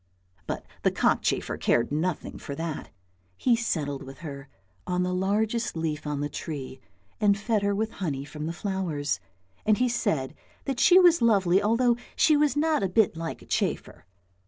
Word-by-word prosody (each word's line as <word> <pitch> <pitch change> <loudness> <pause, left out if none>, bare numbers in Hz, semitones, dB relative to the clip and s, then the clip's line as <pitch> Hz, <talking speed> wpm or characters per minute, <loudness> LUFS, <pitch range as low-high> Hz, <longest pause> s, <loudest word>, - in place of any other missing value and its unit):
But - - -4 0.2
the - - +3
cockchafer - - 0
cared 120 +2 +2
nothing 160 +3 -2
for 140 - -6
that. 165 0 -4 0.5
He 245 - +3
settled 150 - -2
with 135 0 -10
her 140 -2 -7 0.4
on 180 0 0
the 180 0 -1
largest 210 +3 0
leaf 155 -2 -2
on 145 -1 -2
the 145 - 0
tree, 140 -3 -6 0.4
and 200 -1 +4
fed 215 0 0
her 200 0 +1
with 220 +2 -1
honey 140 -7 -3
from 150 +2 -6
the - - -2
flowers, 170 - -2 0.4
and 215 -1 +3
he 250 - +2
said 155 - -1 0.3
that 270 -3 -2
she 360 - +7
was 350 -4 +6
lovely 195 -5 +4
although 230 +3 +3 0.2
she 310 - +5
was 295 0 +2
not 315 -4 +2
a 195 - 0
bit 195 -1 +3
like 165 0 -5
a - - -15
chafer. - - -2
185 Hz, 175 wpm, -27 LUFS, 150-225 Hz, 0.5 s, she